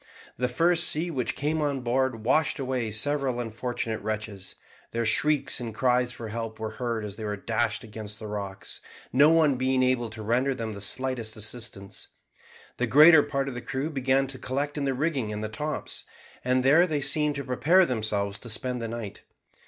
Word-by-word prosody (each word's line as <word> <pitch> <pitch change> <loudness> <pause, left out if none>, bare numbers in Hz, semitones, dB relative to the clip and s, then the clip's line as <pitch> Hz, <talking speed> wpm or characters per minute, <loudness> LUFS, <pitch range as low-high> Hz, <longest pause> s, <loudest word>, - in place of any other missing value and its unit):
The 125 - 0
first 165 +7 +3
sea 170 +3 +2
which 130 -6 -2
came 155 +2 -1
on 140 -3 -1
board 125 -2 0
washed 150 +4 +2
away 130 -4 -2
several 135 +2 +1
unfortunate 115 -1 -3
wretches; 110 -3 -5 0.3
their 115 0 -2
shrieks 145 +4 +2
and 115 -3 -6
cries 125 0 +2
for 115 -3 -8
help 115 0 -5
were 110 0 -4
heard 115 -3 -1
as 105 -1 -7
they 110 - -6
were 105 -1 -3
dashed 115 +2 -1
against 110 -1 -7
the 110 - -9
rocks, 100 -2 -5 0.3
no 145 +4 +6
one 160 -5 +4
being 130 0 +2
able 125 -2 +1
to 110 0 -8
render 125 +5 +1
them 110 -2 -4
the 100 - -8
slightest 120 0 -2
assistance. 105 -3 -5 0.7
The 125 - 0
greater 150 +6 +8
part 140 -1 -2
of 135 - -4
the 120 - -6
crew 140 +5 -3
began 135 -1 +2
to 130 -1 -6
collect 140 +3 -2
in 145 -2 -2
the 135 -1 0
rigging 135 -6 -1
and 105 0 -4
the 110 - -3
tops, 150 +8 -4 0.4
and 125 0 +2
there 160 +7 +5
they 150 -4 -1
seemed 150 +1 +3
to 140 - -4
prepare 160 +9 +4
themselves 105 -6 -2
to 120 - -7
spend 125 +2 -2
the 115 - -3
night. 115 -3 -6
125 Hz, 190 wpm, -27 LUFS, 110-140 Hz, 0.7 s, greater